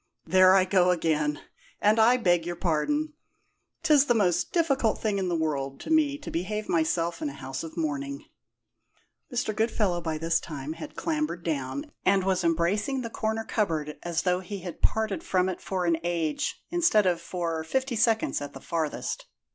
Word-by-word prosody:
"There 185 +2 +6
I 190 -1 +5
go 185 -1 +3
again, 155 -4 +1 0.4
and 215 +2 +3
I 235 +3 +6
beg 175 -7 +2
your 175 +1 -4
pardon! 295 - 0 0.7
'Tis 300 -3 +5
the 240 - +3
most 185 -6 +2
difficult 280 - +2
thing 210 -3 -1
in 185 -2 -1
the 175 - 0
world 140 -4 -2
to - - -6
me 300 -3 +3
to 290 - -8
behave 210 +5 -3
myself 165 - 0
in 305 - -1
a - - -8
house 135 +1 -6
of 165 +1 -9
mourning." 140 -3 -3 1.1
Mr. 235 -4 -1
Goodfellow 215 -5 +1
by 160 -2 -2
this 165 +1 +1
time 150 -1 -6
had 165 - -9
clambered 305 - -2
down, 140 -4 -3
and 195 0 +3
was 185 -1 +1
embracing 190 - +1
the 230 -2 -5
corner 220 0 -2
cupboard 160 -10 -2
as 170 -2 -2
though 180 -1 +2
he 195 +1 -7
had 175 -2 -8
parted 220 -2 0
from 185 -1 +1
it 185 - -4
for 185 -2 -2
an 170 -1 +2
age, 170 -3 -1
instead 335 - +3
of 175 -2 +1
for 170 -2 -3
fifty 260 +9 -1
seconds 225 -5 +2
at 145 0 -6
the - - -9
farthest. 160 -3 -3
180 Hz, 180 wpm, -27 LUFS, 165-220 Hz, 1.1 s, There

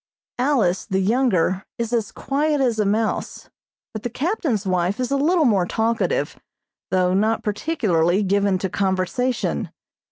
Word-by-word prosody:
Alice, 245 -9 +1
the 190 - 0
younger, 195 -4 +1
is 235 0 -3
as 225 -3 0
quiet 295 +2 -1
as 240 -5 +1
a 210 - +2
mouse, 215 +2 -2 0.4
but 215 - -5
the 240 - -3
captain's 265 - -1
wife 185 +2 0
is 255 +1 -2
a - - +2
little 315 +4 +2
more 195 -7 +2
talkative, 230 - -1 0.5
though 185 -1 +2
not 220 +3 +1
particularly 205 - +1
given 200 0 +2
to 190 - -2
conversation. 195 +7 -1
220 Hz, 140 wpm, -22 LUFS, 190-255 Hz, 0.5 s, a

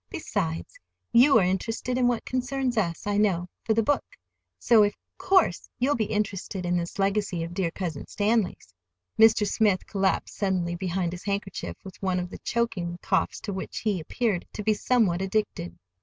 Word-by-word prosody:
"Besides, 80 +1 -3 0.3
you 255 +2 +7
are 210 - +4
interested 225 +6 -1
in 250 -1 +3
what 240 -2 0
concerns 255 0 -1
us, 170 -7 -1
I 205 0 0
know—for 200 +1 0
the 225 - +3
book; 290 +6 +1 0.5
so, 225 -3 +5
of 205 - +1 0.2
course, 370 - +2
you'll 265 +4 +2
be 225 -2 0
interested 200 -3 -2
in 175 0 +1
this 170 0 -3
legacy 195 -3 0
of 165 +1 -6
dear 180 -2 0
Cousin 165 -4 -5
Stanley's." 205 - 0 0.5
Mr. 220 -1 +6
Smith 205 -2 +2
collapsed 195 -2 0
suddenly 185 -4 0
behind 180 0 -2
his 180 0 -8
handkerchief, 200 -1 -3
with 190 -2 -11
one 185 -2 0
of 180 0 -5
the - - -8
choking 210 -7 -2
coughs - - 0
to 205 - -4
which 190 - -5
he 205 -4 0
appeared 195 +3 -1
to 210 - -5
be 215 - +3
somewhat 210 -6 +2
addicted. 190 - -2
200 Hz, 170 wpm, -26 LUFS, 180-225 Hz, 0.5 s, you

